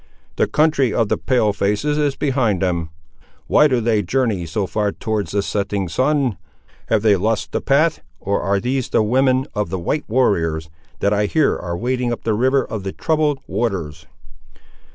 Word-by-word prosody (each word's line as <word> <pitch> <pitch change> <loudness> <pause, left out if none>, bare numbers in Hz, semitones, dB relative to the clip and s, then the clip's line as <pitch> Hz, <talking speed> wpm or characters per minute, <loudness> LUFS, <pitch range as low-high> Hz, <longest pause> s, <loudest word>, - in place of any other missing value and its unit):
"The - - +2
country 150 -5 +2
of 115 -2 0
the - - +1
Pale 120 -6 +1
faces 105 +10 0
is 145 -2 +1
behind 125 -9 0
them. 85 -3 -1 0.6
Why 150 - +5
do 130 -4 +1
they 110 -2 +1
journey 105 -3 -1
so 95 +5 -1
far 105 +1 -1
towards 110 -2 -3
the 100 0 0
setting 100 -2 -2
sun? 130 - 0 0.5
Have 110 -2 +1
they 105 -2 +5
lost 110 +4 -1
the - - -2
path, 150 +4 +2 0.2
or 100 +1 -1
are 100 0 +1
these 125 +3 -2
the - - +2
women 130 +3 +2
of 105 -5 -2
the 95 - -2
white 120 - -2
warriors, 80 -10 +1 0.3
that 100 - +2
I 105 0 +1
hear 155 +6 +2
are 85 -1 -4
wading 125 +2 -1
up 120 - -4
the 110 - 0
river 130 +4 +2
of 110 - -5
'the 95 0 -5
troubled 150 -3 0
waters? 80 -9 -3
110 Hz, 180 wpm, -20 LUFS, 100-130 Hz, 0.6 s, Why